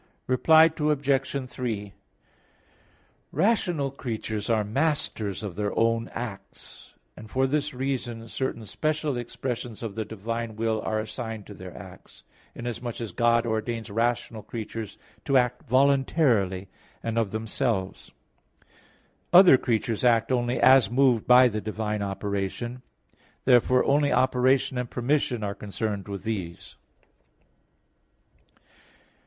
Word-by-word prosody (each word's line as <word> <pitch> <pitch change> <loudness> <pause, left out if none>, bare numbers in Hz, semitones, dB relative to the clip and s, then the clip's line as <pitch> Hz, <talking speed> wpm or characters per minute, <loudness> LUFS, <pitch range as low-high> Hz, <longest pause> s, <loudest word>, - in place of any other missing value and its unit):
Reply 160 +5 +5
Obj. 140 -3 0
3: 110 -5 -4 1.4
Rational 175 - +1
creatures 110 -5 -4
are 110 -2 +2
masters 110 - -1
of 100 -5 -5
their 105 +1 -2
own 115 0 +2
acts; 100 -5 -9 0.2
and 110 0 -11
for 130 +3 +1
this 145 +2 0
reason 125 -3 -4
certain 115 -2 -4
special 150 +6 -1
expressions 120 -1 -5
of 110 -3 -4
the 110 +1 -3
divine 110 +2 -5
will 110 0 -1
are 110 +1 -1
assigned 110 -1 -5
to 105 - -10
their 95 -2 -10
acts, - - -13 0.3
inasmuch 120 0 -5
as 115 -3 -5
God 120 0 +2
ordains 115 0 -3
rational 115 0 -1
creatures 110 -1 -6 0.3
to 135 -2 +3
act 125 +1 0
voluntarily 130 - +2 0.4
and 115 0 -1
of 110 -3 0
themselves. 110 -2 -2 1.2
Other 180 -4 +9
creatures 115 -2 -1
act 120 0 +3
only 120 -1 0
as 130 -1 +6
moved 125 -2 +2
by 125 +1 +8
the 110 -2 -3
divine 105 0 -3
operation; 100 +5 -3 0.6
therefore 125 0 +4
only 145 +1 +3
operation 130 0 +2
and 125 -1 -3
permission 125 -2 0
are 100 -1 -2
concerned 105 0 -4
with 100 -1 -6
these. 95 -7 -5
115 Hz, 120 wpm, -26 LUFS, 110-130 Hz, 1.4 s, Other